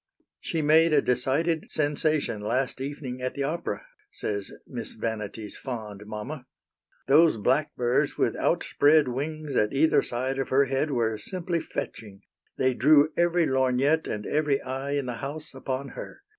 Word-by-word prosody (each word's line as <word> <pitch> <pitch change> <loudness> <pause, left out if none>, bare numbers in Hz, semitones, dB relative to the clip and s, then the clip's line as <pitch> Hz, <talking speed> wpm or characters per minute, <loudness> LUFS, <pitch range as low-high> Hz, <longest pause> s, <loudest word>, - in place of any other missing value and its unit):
"She 160 -2 -2
made 160 +2 +5
a 145 - +5
decided 140 +6 +1
sensation 150 -6 0
last 130 +5 -1
evening 135 -2 -5
at 130 0 -3
the 140 - -1
opera," 170 - -3 0.3
says 100 -2 -4
Miss 120 -3 -6
Vanity's 110 -1 -4
fond 105 -5 -7
mamma. 125 +6 -6 0.6
"Those 155 -1 +5
blackbirds 125 +1 +1
with - - +1
outspread 145 -2 +3
wings 150 +2 -4
at 105 0 +2
either 155 +4 +4
side 130 +3 -2
of 135 - -2
her 140 +1 +4
head 135 +3 0
were 115 -5 0
simply 175 - -2
fetching. 105 -9 -6 0.4
They 130 0 +2
drew 145 +5 +5
every 175 0 +3
lorgnette 130 +3 +2
and 105 -1 -4
every 145 -2 +1
eye 135 +2 -3
in 140 -2 0
the 125 -2 -4
house 150 +2 -6
upon 135 +1 -4
her. 395 - -9
135 Hz, 150 wpm, -27 LUFS, 120-155 Hz, 0.6 s, made